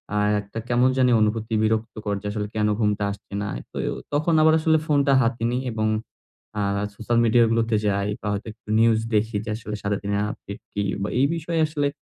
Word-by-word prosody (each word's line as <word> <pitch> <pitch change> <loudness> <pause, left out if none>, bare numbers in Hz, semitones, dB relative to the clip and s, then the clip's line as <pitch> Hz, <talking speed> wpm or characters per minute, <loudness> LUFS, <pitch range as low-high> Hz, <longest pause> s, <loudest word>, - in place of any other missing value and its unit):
আ - - +1 0.2
একটা 105 +3 -7
কেমন 125 +2 +4
জানি 125 -1 +4
অনুভূতি 110 +1 0
বিরক্ত 110 +1 0
করছে 100 0 -2
আসলে 105 -1 -3
কেন 105 0 +2
ঘুমটা 105 -1 +1
আসছে 100 - -11
না। 105 - -2 0.2
তো - - -8 0.4
তখন 155 +3 +2
আবার 160 0 +6
আসলে 160 0 +3
ফোনটা 140 -2 +3
হাতে 115 0 0
নেই 125 +1 -1
এবং 110 0 0 0.7
আ - - +1 0.3
সোশ্যাল 115 +2 -1
মিডিয়া 115 +1 +5
গুলোতে 115 -1 +1
যাই 100 0 0
বা 105 - -5
হয়তো 100 +2 -4
একটু 105 - -20
নিউজ 115 -1 +4 0.2
দেখি 110 +1 +1
যে, - - -5
আসলে 105 -2 -6
সারাদিনে 100 0 -1
আপডেট 100 - -9
কি 100 - -1 0.2
বা - - -2
এই 135 - +5
বিষয়ে 165 0 -2
আসলে 145 -2 -1
110 Hz, 195 wpm, -24 LUFS, 105-125 Hz, 0.7 s, আবার